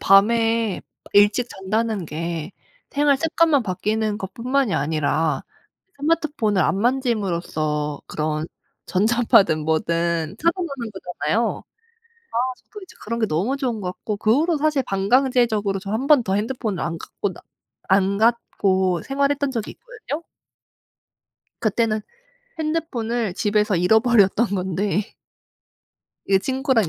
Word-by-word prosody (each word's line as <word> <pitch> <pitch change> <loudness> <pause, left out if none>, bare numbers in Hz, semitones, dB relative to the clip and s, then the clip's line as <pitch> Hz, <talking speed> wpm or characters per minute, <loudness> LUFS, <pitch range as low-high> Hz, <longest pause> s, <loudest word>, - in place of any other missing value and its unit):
밤에 225 +1 +3 0.3
일찍 205 +4 +4
잔다는 215 +1 -2
게 165 +2 -4 0.4
생활 285 -1 +3
습관만 320 -2 +2
바뀌는 215 +2 -1
것 190 -2 -6
뿐만이 255 -1 0
아니라 155 +2 0 0.6
스마트폰을 290 - +1
안 170 +4 +1
만짐으로써 175 - -1
그런 155 0 -2 0.4
전자파든 205 -5 +3
뭐든 165 +2 0
차단하는 320 -8 -1
거잖아요. 190 +3 -2 0.7
아 - - -4 0.2
저도 420 - -13
이제 375 - -14
그런 230 +2 -3
게 220 - +2
너무 200 - 0
좋은 250 -6 -2
것 180 -2 -3
같고 205 +3 -5
그 215 +2 +3
후로 330 0 +1
사실 300 -2 +1
반강제적으로 215 -1 +2
저 195 0 -7
1 235 +5 -1
번 290 -4 +6
더 190 - 0
핸드폰을 215 -2 -2
안 165 -1 -3
갖고 200 +3 -4
나 - - -13 0.5
안 195 +1 +3
갖고 190 -5 +1
생활했던 280 +1 0
적이 230 -5 -4
있거든요. 435 - -7 1.4
그때는 220 0 +1 0.6
핸드폰을 245 - -2
집에서 210 -1 +1
잃어버렸던 220 +3 +4
건데 195 +2 -1 1.1
이게 195 -1 +4
친구랑 260 - +1
215 Hz, 270 characters per minute, -22 LUFS, 190-255 Hz, 1.4 s, 번